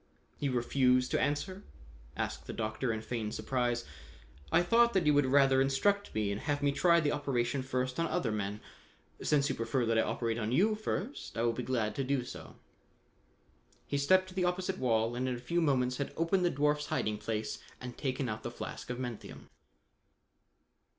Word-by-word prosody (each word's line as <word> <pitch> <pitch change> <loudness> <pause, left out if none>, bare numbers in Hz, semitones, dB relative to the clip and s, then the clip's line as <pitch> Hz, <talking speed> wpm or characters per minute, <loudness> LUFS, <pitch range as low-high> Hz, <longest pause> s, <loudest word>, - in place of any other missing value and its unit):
"You 140 -3 -1
refuse 125 +1 +3
to - - +1
answer?" 150 +8 -1 0.6
asked - - -3
the - - -5
Doctor 110 +3 -2
in 110 -1 -3
feigned 110 -1 -3
surprise. 120 -2 -1 0.7
"I - - +5
thought 235 +5 +4
that 185 -4 +2
you 150 - +5
would 145 -2 +4
rather 135 0 +5
instruct 200 +10 +1
me 105 -2 0
and 100 - -3
have 145 -1 -1
me 145 - +3
try 170 +4 +4
the 150 -3 +1
operation 135 -3 0
first 130 0 -2
on 165 - +2
other 155 -8 -1
men. 105 0 -3 0.6
Since 140 -2 +2
you - - 0
prefer 115 +2 -1
that 115 0 +2
I - - +6
operate 115 0 -1
on 110 0 -2
you 200 - +4
first, 215 - -4
I 115 - +1
will 120 -1 +2
be 125 - -3
glad 115 -4 -1
to 135 - -2
do 130 -1 0
so." - - -9 1.3
He 140 - -1
stepped 185 +6 +4
to - - -11
the 185 -1 0
opposite 180 +1 -1
wall 115 -2 +1
and 130 +1 -1
in 125 - -1
a - - -7
few 170 +8 0
moments 130 -5 +2
had 140 - -3
opened 165 +3 +2
the 175 - +4
dwarf's 150 +1 +1
hiding 105 -1 -1
place 110 -1 -3 0.2
and 125 -1 -7
taken 130 -1 -2
out 110 -1 -4
the 120 - -4
flask 120 - -7
of 125 - -3
menthium. 120 -4 -7
130 Hz, 195 wpm, -32 LUFS, 120-150 Hz, 1.3 s, I